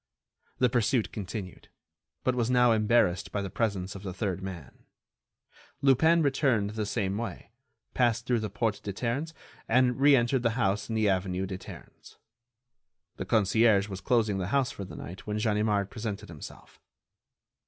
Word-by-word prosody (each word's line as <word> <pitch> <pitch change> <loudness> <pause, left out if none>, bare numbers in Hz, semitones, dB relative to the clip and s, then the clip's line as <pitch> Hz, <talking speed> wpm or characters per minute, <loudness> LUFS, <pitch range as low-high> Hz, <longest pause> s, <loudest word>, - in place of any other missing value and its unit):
The 125 - +4
pursuit 120 0 +1
continued, 100 -2 -7 0.5
but 130 - +2
was 120 -1 0
now 125 -1 +4
embarrassed 110 -4 +2
by 100 - -2
the 95 - -5
presence 100 -5 -1
of 100 - -9
the 95 -3 -6
third 95 -2 -2
man. 90 -7 -9 1.0
Lupin 160 +5 +5
returned 130 -7 +1
the 105 -1 -3
same 100 0 -1
way, 115 - -6 0.4
passed 120 -2 +1
through 120 -1 +1
the 110 -1 -3
Porte 110 -3 -1
des 100 - -5
Ternes, 130 - -2 0.4
and 125 +1 +3
re 145 0 +7
entered 120 +1 +2
the 115 0 0
house 100 -2 0
in 110 - -2
the 110 -1 +2
avenue 95 -1 0
des 95 -1 -6
Ternes. - - -13 1.0
The - - -4
concierge 110 -1 +3
was 95 -1 -6
closing 110 -3 +1
the 90 - -2
house 135 +3 +1
for 100 - -7
the - - -10
night 90 +4 -9
when 105 0 -2
Ganimard 105 -2 0
presented 105 -2 -5
himself. 75 -3 -12
110 Hz, 165 wpm, -28 LUFS, 100-120 Hz, 1.0 s, re